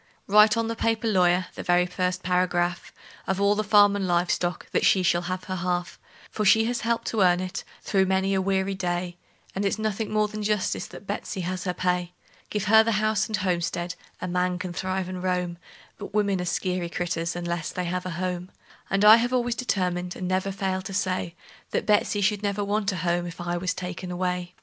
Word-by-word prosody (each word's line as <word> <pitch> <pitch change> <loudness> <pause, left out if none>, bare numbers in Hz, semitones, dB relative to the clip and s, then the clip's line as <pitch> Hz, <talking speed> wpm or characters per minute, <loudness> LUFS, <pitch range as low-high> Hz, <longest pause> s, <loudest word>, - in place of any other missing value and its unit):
Write 210 +2 +6
on 230 0 0
the 230 - -2
paper, 225 0 0
lawyer 180 -3 +3
the - - -6
very 175 0 +3
first 180 0 -2
paragraph 180 -1 0 0.4
Of 190 0 0
all 200 +1 +4
the 215 +1 -1
farm 205 -1 +5
and 195 -2 -1
live 175 0 +2
stock 175 0 -2
that - - +1
she 190 - +4
shall 175 0 +2
have 185 +1 -4
her 185 0 -4
half; 175 0 -2 0.3
For 215 - -2
she 220 +2 +5
has 240 +1 -1
helped 230 +1 -1
to 220 - 0
earn 180 -1 +4
it, 185 0 -4 0.2
through 190 -2 +2
many 190 +1 +1
a 190 - +2
weary 190 0 0
day, 175 -1 -3 0.4
And 195 - -2
it's 200 - 0
nothing 215 0 -2
more 215 0 +2
than 215 0 -6
justice 210 -1 -1
that - - -12
Betsey 195 -1 -4
has 180 +1 -3
her 180 - 0
pay. 180 -1 -1 0.4
Give 210 -2 -2
her 220 +3 +6
the 230 0 0
house 215 0 +1
and 215 -2 -1
homestead 175 -1 -1 0.3
a 185 - -4
man 180 0 0
can 180 -1 -5
thrive 185 +1 -2
and 185 -1 -5
roam; 180 -2 -1 0.4
But 205 0 -8
women 200 -3 +1
are - - -3
skeery 180 0 -1
critters, 170 -1 -2
unless 170 -1 -3
they 180 - -3
have 180 +1 -2
a 170 -2 -5
home; 180 0 -3 0.4
And 195 +2 +2
I 215 +2 +10
have 240 +2 0
always 245 -1 +1
determined, 180 -7 -1
and 185 - -4
never 185 +1 0
failed 190 -1 -2
to 195 - -5
say, 185 -3 -1 0.3
That - - -1
Betsey 210 -1 +2 0.2
never 205 0 -1
should 200 - -2
want 205 0 0
a - - -4
home 175 0 0
if 170 - -9
I 175 0 -2
was 185 +1 -1
taken 180 0 -6
away. 180 0 -3
185 Hz, 215 wpm, -26 LUFS, 180-205 Hz, 0.4 s, I